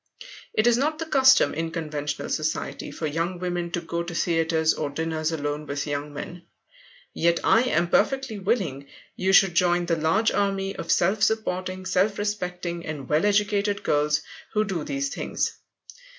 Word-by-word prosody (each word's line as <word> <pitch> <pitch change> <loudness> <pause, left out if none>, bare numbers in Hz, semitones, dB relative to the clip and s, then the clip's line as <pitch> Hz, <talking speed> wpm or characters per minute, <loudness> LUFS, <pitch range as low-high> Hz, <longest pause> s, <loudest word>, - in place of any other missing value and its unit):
It 215 - +3
is 240 -1 +5
not 305 +4 0
the 325 - -4
custom 265 -4 +5
in 165 +2 -2
conventional 150 -3 -4
society 155 0 -2
for 160 - -5
young 165 +4 -2
women 175 -1 -3
to 175 - -1
go 170 0 -3
to 170 0 -6
theatres 165 -1 +2
or 150 - -3
dinners 160 +2 -2
alone 145 -1 -3
with 140 0 -3
young 145 0 -3
men. 170 +4 -7 0.7
Yet 170 0 +2
I 225 - +5
am 175 -8 +1
perfectly 230 +4 +1
willing 185 - -1 0.3
you 190 +1 +1
should 195 -2 +6
join 175 0 +2
the 170 -1 +1
large 165 +8 +2
army 195 -1 -1
of - - -3
self 195 +4 +2
supporting, 185 -4 -1
self 190 +2 +1
respecting, 180 -4 -3
and 145 -4 -6
well 155 +7 +2
educated 205 -1 +1
girls 150 +1 +2 0.3
who 215 -1 +2
do 190 -6 -3
these 140 -1 -2
things. - - -2
175 Hz, 165 wpm, -25 LUFS, 155-200 Hz, 0.7 s, should